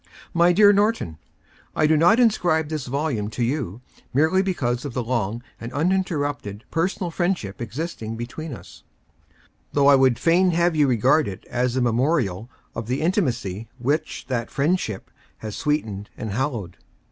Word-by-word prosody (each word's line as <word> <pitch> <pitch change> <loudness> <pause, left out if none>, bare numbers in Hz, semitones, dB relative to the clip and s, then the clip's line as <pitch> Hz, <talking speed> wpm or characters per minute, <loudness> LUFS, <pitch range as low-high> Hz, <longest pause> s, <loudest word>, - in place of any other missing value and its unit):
MT 175 0 +4
DEAR 205 +1 +7
NORTON: 205 - 0 0.3
— - - -31
I 155 - +3
do 155 +1 +4
not 175 +10 +5
inscribe 175 -10 +2
this 155 -5 -4
volume 130 -6 -1
to 120 +2 -2
you, 120 - -2 0.3
merely 160 +7 +4
because 130 -11 -1
of 140 -5 -6
the 125 - -1
long 115 -1 -2 0.2
and 115 +1 -7
uninterrupted 145 - -1
personal 175 +1 -1
friendship 175 - -2
existing 115 -2 -5
between 135 +7 -6
us, 120 - -11 0.5
— - - -35
though 140 -1 +3
I 140 - +8
would 130 -3 +4
fain 175 +7 +3
have 170 0 +2
you 150 -2 +4
regard 130 +5 +3
it 95 -2 -7
as 125 0 0
a 130 - +1
memorial 120 - +1 0.2
of 115 -2 -5
the 125 +3 -1
intimacy 120 - -1
which 140 +5 -2
that 120 -3 -2
friendship 140 - -1 0.3
has 110 -2 -6
sweetened 110 -10 -2
and 110 -3 -4
hallowed. 115 - -3
135 Hz, 160 wpm, -23 LUFS, 115-165 Hz, 0.5 s, I